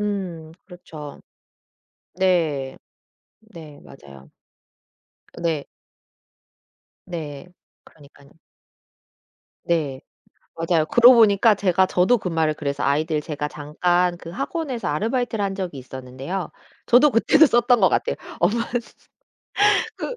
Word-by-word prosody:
음 185 -6 -4
그렇죠. 155 -5 -11 0.9
네. 165 -7 0 0.6
네. 165 -10 -14
맞아요. 70 - -15 1.1
네. 160 -4 -2 1.4
네. 155 -4 -7 0.4
그러니깐. 140 -1 -20 1.3
네. 150 -6 -1 0.6
맞아요. 165 -1 0
그러고 240 +7 +6
보니까 215 -1 +5
제가 190 -1 +2
저도 185 +8 +2
그 - - -5
말을 160 -2 0
그래서 140 -2 -4
아이들 150 +2 0
제가 150 -1 -4
잠깐 175 +4 -1
그 165 - -11
학원에서 270 - -4
아르바이트를 225 - -1
한 195 -1 -2
적이 180 -8 -5
있었는데요. 130 +8 -7 0.3
저도 255 +5 +5
그때도 300 +6 +4
썼던 240 0 +3
것 190 - +5
같아요. 485 - -1 0.2
엄마 230 +2 +1 1.3
그 - - -5
175 Hz, 225 characters per minute, -22 LUFS, 150-210 Hz, 1.4 s, 그러고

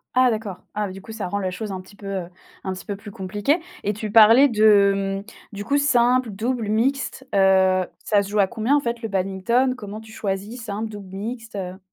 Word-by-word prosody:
Ah 255 -1 +5
d'accord, 215 -4 -4 0.2
ah 210 0 -1
bah, - - -7
du 195 +1 -9
coup 220 - -10
ça 220 -4 -4
rend 200 - -2
les 190 -2 -2
choses 210 +3 -5
un 190 - -4
petit 190 +2 -17
peu, 200 0 -10
heu, 190 -3 -3 0.4
un 190 - -2
petit 185 -2 -9
peu 205 - -4
plus 205 +1 -11
compliquées. 205 - -1 0.2
Et 205 - 0
tu 215 +1 -5
parlais 225 +5 +8
de, 200 -4 +3
mmh, - - -14 0.3
du 205 - -5
coup 285 +6 +1
simple 250 -4 +3
double 225 +3 -2
mixte, 265 +4 -1
heu, 190 -1 +4 0.2
ça 205 -2 +2
se 200 - -8
joue 210 +1 0
à 195 - +5
combien 225 +7 +1
en - - +4
fait 235 -3 -4
le - - -1
badminton? 195 +6 +1
Comment 215 -2 -8
tu 220 0 -14
choisis 210 +3 -4
simple 215 0 -4
double 200 -3 -9
mixte, 225 +2 -6
heu? 185 -1 -5
210 Hz, 230 wpm, -23 LUFS, 195-230 Hz, 0.4 s, parlais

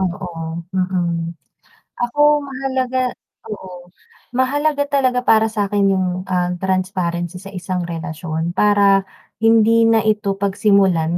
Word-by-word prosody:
Oo, 190 +1 -2 0.5
mm. 175 -3 -1 0.7
Ako 240 +4 -2 0.3
mahalaga 260 -1 -2 0.5
oo, 180 -4 -9 0.5
mahalaga 285 +2 +1
talaga 255 -3 +1
para 220 0 +4
sa'kin 205 -2 +1
yung, 185 -1 0 0.2
ah, 180 -1 0
transparency 185 -2 -2
sa 195 - -10
isang 185 -1 -4
relasyon 165 0 -4
para 200 -1 +4 0.4
hindi 225 0 +4
na 225 -2 +3
ito 210 -2 0
pagsimulan 195 -4 +2
195 Hz, 105 wpm, -19 LUFS, 180-225 Hz, 0.7 s, para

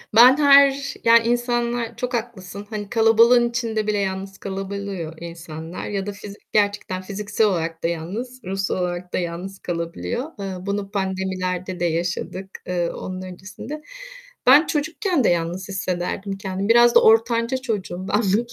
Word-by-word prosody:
Ben 250 +4 +9
her 280 -1 +5
Yani 230 0 +6
insanlar 240 -1 0
Çok 250 +1 -3
haklısın, 205 -4 -5
hani, 205 -2 -5
kalabalığın 230 +2 +5
içinde 225 -3 -2
bile 210 -1 +1
yalnız 195 0 -3
kalabiliyor 195 -3 -5
insanlar 165 0 -7
ya 200 -1 -2
da 205 - -3
fizik 200 0 -12
gerçekten 205 -3 +1
fiziksel 205 +2 0
olarak 165 -3 -2
da - - +2
yalnız, 210 +10 -5
ruhsal 195 +1 -1
olarak 180 0 -3
da - - +1
yalnız 180 +2 -4
kalabiliyor. 175 - -4
Iıı, 190 -2 -5
bunu 200 0 -3
pandemilerde 185 -2 -2
de 175 - +1
yaşadık. 175 +3 -2 0.2
Eee, 175 -1 0
onun 185 0 -6
öncesinde. 190 +10 -8 0.7
Ben 285 +6 +8
çocukken 320 - 0
de - - +5
yalnız 175 +3 -1
hissederdim 190 +1 -3
kendimi. 195 +1 -3
Biraz 235 +1 +6
da - - +7
ortanca 230 +3 +4
çocuğum 200 -7 -4
ben 210 - +2
bugün, 220 +4 0
200 Hz, 150 wpm, -22 LUFS, 185-235 Hz, 0.7 s, Ben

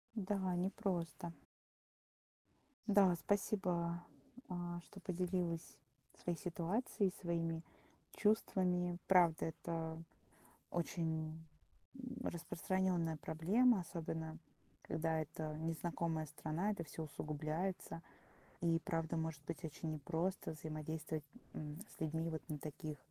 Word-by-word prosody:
Да, 190 -3 +1
непросто. 175 -2 0 1.6
Да, 195 -4 +7
спасибо, 175 -4 +1 0.5
а, 175 -1 -2
что 195 +3 -12
поделилась 180 -2 0 0.5
своей 175 -2 +1
ситуацией, 185 - +1
своими 165 -2 0 0.5
чувствами. 180 -4 +3
Правда, 175 -4 +6
это 160 0 -2 0.7
очень, 160 -2 0 0.6
м, 250 0 -5
распространённая 175 -1 +1
проблема, 195 - +4
особенно, 160 -2 -3 0.4
когда 160 0 +1
это 155 0 -3
незнакомая 165 0 0
страна, 155 +6 0
это 175 -5 -2
всё 160 +1 -5
усугубляется. 155 +4 -2 0.6
И 165 -1 +4
правда, 165 0 +1
может 160 -2 -1
быть 165 -2 -4
очень 160 0 -3
непросто 165 +5 0
взаимодействовать, 155 0 -3 0.3
м, 150 +1 -4
с - - -15
людьми 160 +1 0
вот 160 -1 -4
на 150 -1 -2
таких, 150 0 -4
165 Hz, 100 wpm, -40 LUFS, 160-180 Hz, 1.6 s, Да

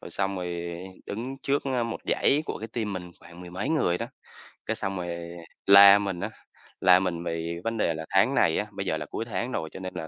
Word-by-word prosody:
rồi - - -10
xong 95 0 -1
rồi 85 -1 -4 0.3
đứng 120 +6 -5
trước, 140 +1 +1
ơ, 130 -3 0
một 115 - -4
dãy 145 +3 +2
của - - -4
cái 110 - -6
team 110 -2 -3
mình 90 -2 -6
khoảng 85 0 -13
mười 90 -1 -9
mấy 95 +4 -3
người 115 - +1
đó, - - -3 0.6
cái 110 - -1
xong 95 -3 -3
rồi 85 -1 -4 0.5
la 100 0 +10
mình 95 -3 -3
á, - - -3 0.5
la 90 -1 +7
mình 90 -3 -2
vì 85 0 -3
vấn 115 0 -2
đề 85 - +1
là 80 0 -6
tháng 105 +8 +3
này 80 - +3
á, - - 0
bây 95 -1 -5
giờ 80 - 0
là 75 - -5
cuối 115 - -5
tháng 120 +2 -3
rồi, 80 -9 -3
cho - - -7
nên 95 0 -6
là 80 -3 -5
95 Hz, 245 wpm, -27 LUFS, 85-110 Hz, 0.6 s, la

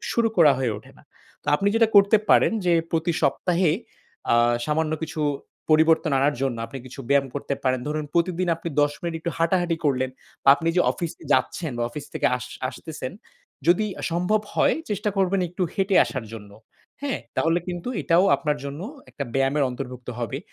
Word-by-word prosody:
শুরু 230 -1 +3
করা 155 -4 +7
হয়ে 125 -4 0
ওঠে - - -13
না। - - -19 0.4
তো - - -30
আপনি 200 +4 +1
যেটা 225 -1 +4
করতে 200 +2 +7
পারেন - - +5
যে 175 - +4 0.2
প্রতি 165 +1 0
সপ্তাহে 180 -2 +2 0.6
আ - - +6 0.3
সামান্য 155 +1 0
কিছু 160 0 -4 0.5
পরিবর্তন 160 0 +4
আনার 145 +2 +2
জন্য 130 -4 0
আপনি 135 +4 -8
কিছু 130 +2 -9
ব্যায়াম 140 -1 +3
করতে 140 0 -2
পারেন। 130 -1 +1
ধরুন 150 0 -2
প্রতিদিন 175 +1 +1
আপনি 165 +1 -5
দশ 145 - +2
মিনিট 170 -1 -3
একটু 170 - -2
হাঁটাহাঁটি 170 0 +1
করলেন 130 -2 +1 0.3
বা - - +3
আপনি 165 +1 -2
যে - - +5
অফিস 170 -3 -4 0.2
যাচ্ছেন 160 -5 0
বা 120 - 0
অফিস 145 +4 -7
থেকে - - 0
আস 125 0 -7 0.2
আসতেছেন, 150 -2 -7 0.5
যদি 180 +5 +4 0.2
সম্ভব 180 +6 +1
হয় - - +3 0.2
চেষ্টা 210 +1 -1
করবেন 195 0 +2
একটু 180 +2 -4
হেঁটে 195 -1 +1
আসার 130 -5 -5
জন্য। 105 -2 -9 0.5
হ্যাঁ, 280 -3 -2 0.2
তাহলে 165 +2 +2
কিন্তু 175 +4 -4
এটাও 170 +3 +4
আপনার 150 -2 -1
জন্য 140 +2 -6 0.3
একটা 140 - -5
ব্যায়ামের 135 +2 +2
অন্তর্ভুক্ত 125 -1 -7
হবে। 120 -3 -3
160 Hz, 180 wpm, -24 LUFS, 140-180 Hz, 0.6 s, করা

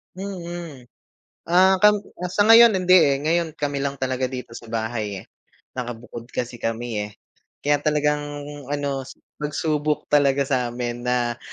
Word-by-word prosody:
Mm. 175 -7 -7 0.6
Ah, 185 +2 +5
kam 210 0 +5 0.2
ah, 180 - -3
sa 205 - +3
ngayon, 225 0 +8
hindi, 185 0 +5
eh. 140 -4 +4
Ngayon 165 0 0
kami 145 -2 -2
lang 140 0 -2
talaga 130 0 0
dito 125 -2 -7
sa - - -11
bahay, 110 -3 -3
eh. - - -23 0.5
Nakabukod 120 -1 -6
kasi 120 -1 -3
kami, 115 -1 -3
eh. - - -12 0.5
Kaya 145 0 +2
talagang 150 0 +1 0.5
ano, 140 -2 -3 0.3
pagsubok 150 0 -1
talaga 140 -1 +4
sa'min 120 -2 -2
na 120 -1 0
140 Hz, 140 wpm, -23 LUFS, 120-170 Hz, 0.6 s, ngayon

